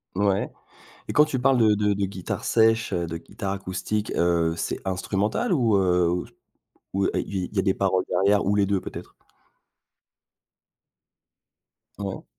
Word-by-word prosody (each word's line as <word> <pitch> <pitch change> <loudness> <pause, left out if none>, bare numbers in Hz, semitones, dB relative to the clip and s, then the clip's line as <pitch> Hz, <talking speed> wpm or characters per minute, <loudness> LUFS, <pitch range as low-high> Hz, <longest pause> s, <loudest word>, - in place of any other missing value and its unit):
Ouais 100 0 +1 0.6
et - - -2
quand 150 - +6
tu 140 -4 -2
parles 135 0 +3
de 110 -2 +5
de 105 0 +1
de 100 0 -1
guitare 95 -2 -5
sèche, 115 0 +3
heu, 85 -1 -1
de 85 - -5
guitare 95 +3 -5
acoustique, 100 +2 -3
heu, 85 -1 +2
c'est - - -2
instrumental 100 - -1
ou 115 -8 +3
heu, 90 -2 +2 0.7
ou 95 0 +1
il 95 -2 -2
il - - -14
y - - +2
a - - +2
des 95 - +2
paroles 95 -1 +1
derrière 100 +3 +2
ou 100 - +2
les 100 -1 +2
2 100 -1 +1
peut-être? - - -9 2.9
Ouais. 100 -2 -5
100 Hz, 155 wpm, -25 LUFS, 95-105 Hz, 2.9 s, quand